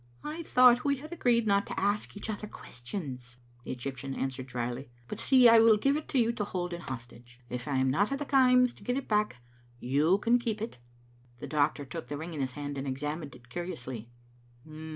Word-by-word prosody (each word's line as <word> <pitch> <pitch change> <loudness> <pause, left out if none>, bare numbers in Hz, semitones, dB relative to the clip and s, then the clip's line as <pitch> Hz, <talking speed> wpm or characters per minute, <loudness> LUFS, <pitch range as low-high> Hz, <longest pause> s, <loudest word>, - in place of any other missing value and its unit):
" 120 - -30
I 310 +3 -5
thought 250 -5 +5
we 280 -1 +2
had 305 +5 -10
agreed 240 -8 +2
not 200 -1 +2
to - - -4
ask 205 +1 -1
each 205 - -5
other 215 -1 -4
ques 125 - -11
tions," 125 -6 -6 0.3
the - - -5
Egyptian 135 +1 -5
answered 130 -1 -3
drily. 125 +1 -4
" 120 0 -30
But, - - -6
see, 255 -2 +6
I 230 0 +8
will 225 -1 +6
give 275 +6 +2
it 305 - -4
to 275 - 0
you 230 -2 +3
to 225 - -3
hold 180 -3 -3
in 170 - -5
hostage. 120 -3 -9
If 125 +3 -4
I 140 - -1
am 130 0 +2
not 200 - +2
at 275 - 0
the 290 - -4
Kaims 250 -3 +4
to - - -16
get 250 +1 -1
it 275 - -4
back 210 - +1 0.4
you 145 +9 +3
can 235 +4 +3
keep 225 -3 -2
it. 225 - -6 0.3
" 120 0 -30
The - - -6
doctor 145 -1 0
took 125 -1 -7
the 145 - -4
ring 165 +3 -6
in 150 - -3
his 130 -1 -2
hand 145 0 -5
and 135 - -4
examined 150 +3 -4
it 120 0 -18
curiously. 125 -8 -6
160 Hz, 235 wpm, -30 LUFS, -, 0.4 s, I